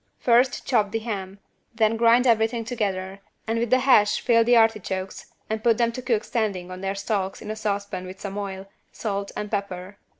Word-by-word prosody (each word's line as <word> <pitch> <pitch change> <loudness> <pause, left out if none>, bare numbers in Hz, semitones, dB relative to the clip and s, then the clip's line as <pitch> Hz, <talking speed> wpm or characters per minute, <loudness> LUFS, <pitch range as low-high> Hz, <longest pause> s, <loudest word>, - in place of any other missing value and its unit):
First 245 +2 +2
chop 215 -6 +2
the 225 - -2
ham, 200 -4 -5 0.4
then 220 0 +2
grind 235 +2 +4
everything 225 -1 +2
together 195 -5 -3 0.3
and 225 +1 -1
with 235 0 -1
the 255 +2 +4
hash 230 -6 +4
fill 230 -1 +4
the 240 +1 +4
artichokes, 200 -4 0 0.2
and 220 0 -3
put 230 -2 +4
them 235 -1 +2
to 255 - -6
cook 235 -3 0
standing 200 -8 -2
on 185 0 -7
their 195 0 -2
stalks 195 -1 -2
in - - -6
a - - -4
saucepan 200 -3 -3
with 190 +1 -10
some 200 -1 -6
oil, 195 -2 -5 0.3
salt 200 -2 -4
and 210 -1 -4
pepper. 200 -1 -4
215 Hz, 195 wpm, -24 LUFS, 195-230 Hz, 0.4 s, grind